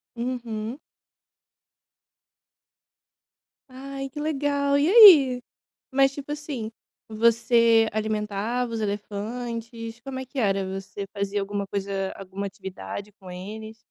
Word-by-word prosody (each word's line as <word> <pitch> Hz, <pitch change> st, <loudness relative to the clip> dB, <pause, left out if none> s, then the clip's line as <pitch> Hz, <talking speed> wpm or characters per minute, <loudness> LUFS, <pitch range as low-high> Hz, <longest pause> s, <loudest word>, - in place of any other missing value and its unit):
Uhum. 235 Hz, 0 st, -4 dB, 2.9 s
Ai, 270 Hz, +1 st, -7 dB
que 295 Hz, -, -14 dB
legal! 285 Hz, -2 st, +1 dB
E 290 Hz, -, +3 dB
aí? 305 Hz, -, +9 dB, 0.5 s
Mas, 270 Hz, 0 st, +4 dB
tipo 285 Hz, +1 st, -6 dB
assim, 285 Hz, -7 st, -5 dB, 0.4 s
você 230 Hz, 0 st, +4 dB
alimentava 215 Hz, +2 st, -2 dB
os 225 Hz, -, -2 dB
elefantes, 230 Hz, +3 st, -5 dB
como 265 Hz, +1 st, -6 dB
é 260 Hz, -, -6 dB
que 270 Hz, -, -9 dB
era? 195 Hz, -3 st, +1 dB
Você 195 Hz, +1 st, -7 dB
fazia 200 Hz, 0 st, -1 dB
alguma 200 Hz, 0 st, -3 dB
coisa 195 Hz, -1 st, -3 dB
alguma 195 Hz, +1 st, -6 dB
atividade 195 Hz, +1 st, -7 dB
com 185 Hz, -1 st, -11 dB
eles? 215 Hz, +5 st, -8 dB
230 Hz, 110 wpm, -25 LUFS, 205-260 Hz, 2.9 s, aí